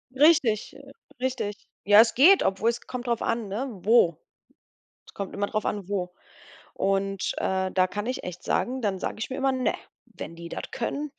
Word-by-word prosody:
Richtig, 270 -7 +3 0.4
richtig. 235 -6 -3 0.2
Ja, 205 +1 +7
es 230 - +2
geht, 355 +10 +7
obwohl 195 +4 +1
es 235 0 -2
kommt 250 -1 -7
drauf 235 -1 0
an, 230 -2 -1
ne, 215 +8 -3
wo. 195 -4 +3 0.9
Es - - -17
kommt 200 -1 -6
immer 200 +1 -1
drauf 215 - -2
an, 200 -3 -3
wo. 180 -3 -2 0.6
Und, 195 0 -1
äh, 190 0 -1
da 185 -1 +3
kann 205 +3 -4
ich 255 +2 -3
echt 180 0 -7
sagen, 255 +1 -1
dann 200 -4 -1
sage - - -4
ich 220 - -4
mir 260 - -4
immer: 270 0 +2
„Ne, 255 -1 0 0.3
wenn 165 - -9
die 170 0 -9
das - - -5
können, 285 +5 -3
215 Hz, 190 wpm, -26 LUFS, 195-250 Hz, 0.9 s, Ja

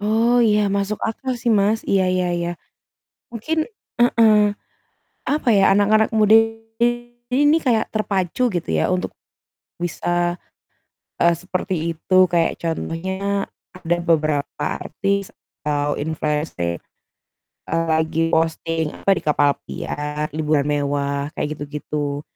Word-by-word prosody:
Oh 225 +4 +3
iya, 210 -3 +3
masuk 200 +1 -1
akal 250 +3 -3
sih, 235 -1 0
Mas, 210 +1 +2
iya 190 -2 +2
iya 185 0 +1
iya. 175 0 -1 0.8
Mungkin 310 +8 -1 0.4
heeh, 225 -3 +5 0.8
apa 295 -2 -1
ya, 195 -1 +5
anak-anak 215 +2 +3
muda 215 -1 +4 1.0
ini 290 +4 +4
kayak 235 -4 +1
terpacu 210 +3 0
gitu 175 - -3
ya 80 - +1
untuk 185 0 -2 0.7
bisa, 175 0 -1 0.8
eee, 170 0 +4
seperti 185 +2 -3 0.2
itu, 185 +3 +1
kayak 170 -1 +1
contohnya 190 +4 -2 0.3
update 175 -1 -2
beberapa 155 -3 0
artis 195 +3 -2 0.4
atau 145 -1 0
influenser, 150 - -2 0.9
eee, 165 +1 0
lagi 160 +1 +1
posting 160 -1 0
apa - - -1
di - - -4
kapal 145 -1 +3
pesiar, 150 +1 -4
liburan 155 -2 +1
mewah, 140 -1 -1
kayak 150 0 -3
gitu-gitu. 145 0 -4
175 Hz, 115 wpm, -21 LUFS, 155-210 Hz, 1.0 s, heeh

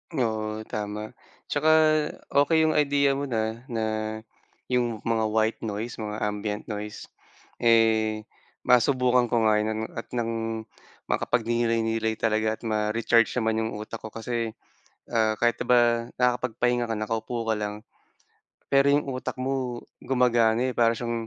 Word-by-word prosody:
Oo 110 -4 -1
tama. 105 0 -5 0.4
Tsaka 145 +2 +1 0.6
okey 160 +3 +4
'yung 160 - +3
idea 140 -2 +3
mo 140 +1 -2
na, 115 0 -3
na 115 -4 -2 0.9
'yung 120 -3 0
mga 115 -1 +1
white 110 +1 +1
noise 110 +2 -5
mga, 105 0 -4
ambient 105 0 -2
noise. 105 0 -7 0.5
Eh 110 -2 +3 0.4
masubukan 125 0 +3
ko 115 -1 +1
nga 110 -1 +4
'yan 110 +1 -1 0.2
at - - -8
ng 115 -1 -2 0.5
makapagnilay-nilay 115 -1 0
talaga 110 0 0
at - - -25
ma-recharge 110 +1 +2
naman 110 -2 +1
'yung 110 0 -2
utak 110 +2 -7
ko. - - -8
Kasi, 115 0 -4 0.6
ah, 110 -2 +2
kahit 120 -2 +3
'di - - -4
ba, 120 -1 +3
nakakapagpahinga 125 -1 +1
ka 115 - -2
nakaupo 110 +2 -3
ka - - +3
lang, 105 0 -3 1.0
pero 140 0 +4
'yung 145 -1 0
utak 130 0 -4
mo 130 -2 -2 0.2
gumagana 120 -1 +2
eh, - - -7
para 115 -1 +3
siyang 115 -1 -3
115 Hz, 140 wpm, -26 LUFS, 110-125 Hz, 1.0 s, okey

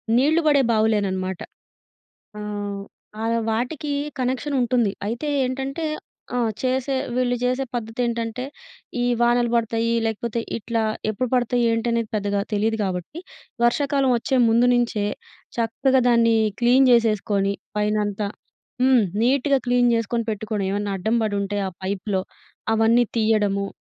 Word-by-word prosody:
నీళ్ళు 305 +6 +3
బడే 285 -2 +5
బావులేననమాట. 200 -4 0 1.0
ఆహ్, 205 -1 -4 0.4
ఆహ్, 230 +1 +1
వాటికీ 260 +6 -2 0.3
కనెక్షనుంటుంది. 250 -4 0 0.2
అయితే 240 +7 -3 0.2
ఏంటంటే 275 +5 -3 0.5
ఆ! - - +1 0.2
చేసే 260 +1 0 0.2
వీళ్ళు 245 -1 +1
జేసే 255 +2 +1
పద్ధతేంటంటే, 235 +1 -2 0.6
ఈ - - +1 0.2
వానలు 240 0 +3
పడతాయ్యీ, 230 0 +1
లేకపోతే 230 +1 -2 0.2
ఇట్లా 230 0 -2 0.3
ఎప్పుడు 245 +4 -2
పడతయి, 245 0 +1
ఏంటి 230 +1 -1
అనేది 230 -2 0
పెద్దగా 205 -1 0
తెలీదు 220 +2 +1
గాబట్టి, 185 - -4 0.5
వర్షాకాలవొచ్చే 265 -1 +2
ముందు 235 +2 +4
నించే, 235 -4 +1 0.5
చక్కగా 260 +3 +2
దాన్ని 230 -1 +4 0.2
క్లీన్ 250 +2 +5
జేసేసుకోని 210 -4 +2 0.2
పైనంత. 210 -1 0 0.6
హ్మ్. 255 -3 +5 0.2
నీట్‌గా 275 +2 +3
క్లీన్ 245 0 +3
జేసుకొని 230 0 -1
పెట్టుకొని, 210 -2 -3
ఏవన్నా 205 0 -2
అడ్డం 220 +6 0
బడుంటే 205 -1 -1
ఆ - - -6
పైప్‌లో 195 0 -1 0.5
అవన్నీ 230 +2 +4
తియ్యడము. 205 -3 +1
230 Hz, 115 wpm, -23 LUFS, 210-250 Hz, 1.0 s, బడే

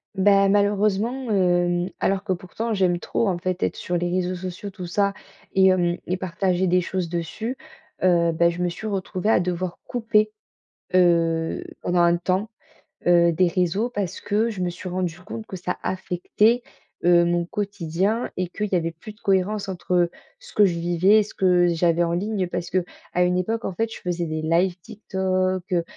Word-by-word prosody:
Bah, 195 0 +4
malheureusement, 210 +5 +1
hem, 175 -2 +2
alors 195 0 0
que 195 -3 0
pourtant 200 +6 -4
j'aime 185 -3 +2
trop, 230 - -1
en 180 -3 0
fait, 185 0 -3
être - - 0
sur 175 - -3
les 175 0 0
réseaux 180 0 0
sociaux 185 +2 -6
tout 180 -2 -7
ça 200 +2 +1 0.4
et 190 0 +5
hem 175 -2 +2
et 180 - -1
partager 185 0 0
des 180 0 +3
choses 180 -1 -3
dessus, 175 +9 -3 0.5
heu, 170 -2 +4
bah, 170 +1 +3
je 170 +1 -4
me 175 - +1
suis 200 +5 -6
retrouvée 195 0 -2
à 225 - +5
devoir 180 0 -2
couper, 215 -3 +1 0.6
heu, 165 -2 +2 0.2
pendant 175 0 +1
un 170 0 +4
temps, 185 +4 -1 0.6
heu, 170 -1 +5
des 180 +3 +3
réseaux 185 +6 0
parce 205 -7 -3
que 220 +3 0
je 200 -4 -5
me 180 - 0
suis 180 +1 -7
rendue 175 -2 -3
compte 220 +4 -7
que 190 - -8
ça 180 - -3
affectait, 190 +5 +1 0.4
heu, 175 -1 +6
mon 175 0 +1
quotidien 200 +3 -2
et 185 - -1
qu'il 210 +4 -3
y - - +2
avait 165 -1 -1
plus 215 - -9
de 210 - -28
cohérence, 195 +1 0
entre 180 -2 0 0.3
ce - - -15
que 210 - +5
je 190 -3 +4
vivais 175 +5 +4
et - - +3
ce 205 - -11
que 180 -2 +3
j'avais 170 0 +2
en 170 0 0
ligne, 195 +1 -1
parce 175 0 -4
qu'à 185 - +2 0.5
une 180 0 +1
époque, 225 +5 -1
en - - -3
fait, 225 +4 -2
je - - -9
faisais 175 -1 -2
des 155 -1 -3
lives 170 +3 +1
TikTok, 185 -1 -1
heu, 170 -1 +2
185 Hz, 190 wpm, -23 LUFS, 175-200 Hz, 0.6 s, heu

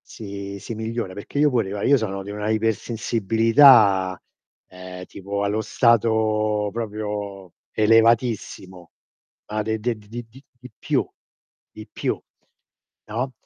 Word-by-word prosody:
si 100 -2 -8
si 115 - -7
migliora, 110 -3 -4
perché 100 +8 -6
io 150 0 +4
pure, 115 -6 0
no, 100 0 -4
io 140 - +5
sono 100 -3 -4
di 100 - -9
una 105 +1 -4
ipersensibilità, 110 -2 +3 0.5
ehm, 90 0 -10
tipo 100 +2 -5
allo 105 +2 0
stato 110 -3 +2
proprio 105 -4 -5 0.2
elevatissimo. 110 -5 +1 0.6
Ma 110 0 -1
de 110 +1 -2
de 115 +1 -2
di 105 -1 -19
di 120 +2 -7
di 135 +4 -17 0.2
di 125 - -12
più - - 0 0.6
di 110 - -11
più, - - -2 0.9
no, 125 +5 -3
110 Hz, 130 wpm, -23 LUFS, 100-115 Hz, 0.9 s, io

